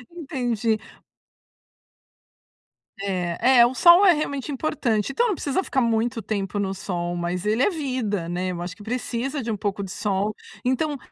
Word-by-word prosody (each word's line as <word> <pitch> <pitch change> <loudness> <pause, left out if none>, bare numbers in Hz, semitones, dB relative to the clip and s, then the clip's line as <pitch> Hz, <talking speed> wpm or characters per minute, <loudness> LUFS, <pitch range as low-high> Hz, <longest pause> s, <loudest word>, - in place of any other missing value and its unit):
Entendi. 240 -8 -1 2.2
É. 195 +6 +2
É, 235 - +9
o 240 - 0
sol 345 +7 +7
é 370 - +8
realmente 290 -2 -3
importante, 265 -5 -1
então 480 - +2
não 415 - 0
precisa 290 +7 -1
ficar 270 - 0
muito 230 0 0
tempo 205 -1 -3
no 195 -1 -1
sol, 175 -2 -3
mas 175 +2 -3
ele 220 +4 +1
é - - +4
vida, 255 - -2
né. 180 +2 -2
Eu 175 -1 -5
acho 180 +1 -5
que 210 - -13
precisa 250 +4 -3
de 235 - -5
um - - -1
pouco 200 0 -2
de 190 - -7
sol. 205 +1 -1 0.3
Então, 285 +3 0
225 Hz, 165 wpm, -24 LUFS, 195-270 Hz, 2.2 s, É